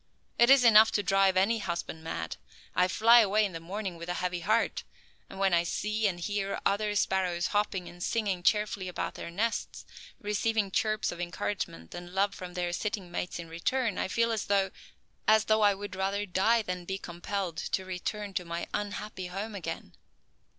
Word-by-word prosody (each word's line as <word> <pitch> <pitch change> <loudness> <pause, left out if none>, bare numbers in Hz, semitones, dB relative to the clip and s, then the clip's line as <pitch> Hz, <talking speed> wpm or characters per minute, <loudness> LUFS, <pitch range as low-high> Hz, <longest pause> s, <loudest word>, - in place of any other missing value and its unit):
It 235 +1 +6
is 270 -1 +7
enough 220 -2 +8
to 205 - +1
drive 195 0 +3
any 220 +5 +3
husband 170 -4 -4
mad. 85 - -4 0.4
I 180 - +4
fly 230 +5 +6
away 215 -1 +4
in 200 - -3
the 165 - -6
morning 185 +1 -5
with 170 +1 -8
a 180 - -1
heavy 180 -1 -2
heart, 215 +6 +1 0.5
and - - -10
when 195 -1 +2
I 170 - +5
see 210 +5 0
and 175 -3 -2
hear 200 +2 -2
other 205 +1 +1
sparrows 185 -3 +1
hopping 205 -3 0
and 175 +1 -11
singing 200 -4 0
cheerfully 205 -1 +1
about 180 - -3
their - - -7
nests, 220 +7 -2 0.3
receiving 210 0 0
chirps 215 +2 0
of 175 - -6
encouragement 175 - -4
and 175 +1 -8
love 195 +1 +2
from 180 -1 -8
their 175 -1 -1
sitting 200 -2 -3
mates 180 +1 -3
in 170 -1 -7
return, 210 +6 -1
I - - 0
feel 230 +4 +1
as 220 -2 -1
though 195 -1 +2 0.6
as 215 0 +5
though 215 0 +3
I 205 -1 +5
would 205 0 -7
rather 195 +2 -1
die 215 +5 +2
than 180 -2 -4
be 190 +2 -3
compelled 175 -1 -4
to 190 - -2
return 195 +2 -4
to 180 - -1
my 170 0 -4
unhappy 205 -2 -4
home 200 +5 -5
again." 195 -5 -6
195 Hz, 190 wpm, -29 LUFS, 180-210 Hz, 0.6 s, enough